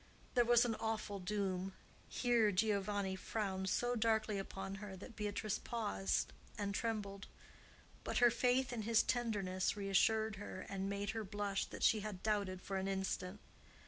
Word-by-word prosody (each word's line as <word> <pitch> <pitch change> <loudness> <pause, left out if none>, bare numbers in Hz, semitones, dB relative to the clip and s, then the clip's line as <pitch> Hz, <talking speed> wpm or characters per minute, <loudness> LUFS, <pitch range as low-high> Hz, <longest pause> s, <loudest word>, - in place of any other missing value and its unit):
—there 245 - +5
was 240 0 +5
an 235 - +1
awful 215 -2 -2
doom." 190 -1 -1 0.4
Here 235 -4 +3
Giovanni 200 -1 +1
frowned 190 -1 -2
so 245 +4 +1
darkly 220 -2 +2
upon 195 +1 -5
her 195 -2 -6
that 220 +5 -10
Beatrice 210 0 -2
paused 210 -4 -1 0.2
and 200 -1 -1
trembled. 205 -2 -2 0.8
But - - -1
her 240 -1 +7
faith 250 +2 +2
in 230 - -2
his 225 +1 +4
tenderness 205 -6 0
reassured 215 +2 +2
her, 190 -2 -6
and 195 0 -2
made 200 +1 -1
her 225 0 -3
blush 205 -1 -1
that - - -7
she 220 - +5
had 205 -3 -5
doubted 200 -4 0
for 195 - -2
an 190 0 -1
instant. 190 0 -2
205 Hz, 155 wpm, -38 LUFS, 195-225 Hz, 0.8 s, her